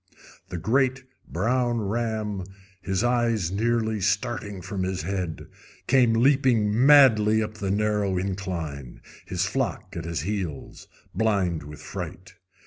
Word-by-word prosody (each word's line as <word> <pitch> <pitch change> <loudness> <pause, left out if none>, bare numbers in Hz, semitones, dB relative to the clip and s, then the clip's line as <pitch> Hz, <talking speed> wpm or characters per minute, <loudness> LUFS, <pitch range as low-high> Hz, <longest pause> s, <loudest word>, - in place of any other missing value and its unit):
The 90 - -4
great 130 - +1 0.2
brown 120 +6 0
ram, 110 -2 -2 0.4
his 95 +2 -1
eyes 120 -7 +1
nearly 110 0 0
starting 105 0 -1
from 95 +1 -4
his 95 -2 -2
head, 90 -3 -3 0.4
came 125 -3 +4
leaping 120 -2 +3
madly 110 -7 +6
up 110 - -5
the 100 - -2
narrow 105 -1 +1
incline, 90 -8 -4 0.3
his - - -1
flock - - -3
at 85 -1 -5
his 85 -4 -3
heels, 90 -5 -5 0.3
blind 95 -5 +1
with 75 +1 -11
fright. - - -7
105 Hz, 125 wpm, -25 LUFS, 95-115 Hz, 0.4 s, madly